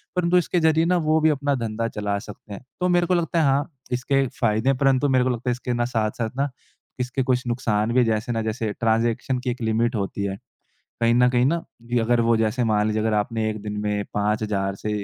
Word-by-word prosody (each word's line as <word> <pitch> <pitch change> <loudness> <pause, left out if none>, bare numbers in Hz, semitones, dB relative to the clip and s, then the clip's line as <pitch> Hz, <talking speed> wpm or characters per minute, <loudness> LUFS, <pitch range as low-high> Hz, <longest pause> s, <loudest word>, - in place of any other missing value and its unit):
परंतु 180 0 +3
इसके 175 0 +1
ज़रिए 160 0 +3
ना 180 +1 +2
वो 155 +1 +4
भी 160 - +4
अपना 145 -1 0
धंधा 115 +1 -2
चला 100 -1 -1
सकते 105 0 -10
हैं। 100 - -9 0.2
तो 180 - +1
मेरे 175 0 +3
को 185 - +2
लगता 170 -1 +1
है - - +3
हाँ 135 +1 +1 0.2
इसके 135 +2 +1
फ़ायदे 110 +2 +2
हैं। 135 - +2
परंतु 135 +1 +2
मेरे 125 - +4
को 130 - +1
लगता 125 0 -2
है - - +3
इसके 125 0 -3
ना 120 0 0
साथ-साथ 110 +1 0
ना 140 +1 +1 0.5
इसके 125 +1 -1
कुछ 125 0 +2
नुकसान 115 -3 0
भी 130 - +4
हैं। 120 - +4
जैसे 110 +2 -1
ना 115 - -1
जैसे 110 -1 -2
ट्रांजेक्शन 115 +3 +1
की 125 0 -3
एक 120 0 -4
लिमिट 115 +2 +1
होती 100 -1 -2
है। 95 0 -3 0.7
कहीं 115 0 +4
न 125 +1 +5
कहीं 125 -1 +2
ना 165 +5 +2 0.3
दी 120 - +2
अगर 120 +1 +2
वो 115 -1 +4
जैसे 115 +3 0
मान 105 -1 +2
लीजिए 110 0 0
अगर 110 0 +1
आपने 110 +1 -2
1 110 -1 -6
दिन 105 -1 -5
में 105 -1 -1
5000 105 -2 0
से 105 - -2
120 Hz, 240 wpm, -23 LUFS, 110-135 Hz, 0.7 s, न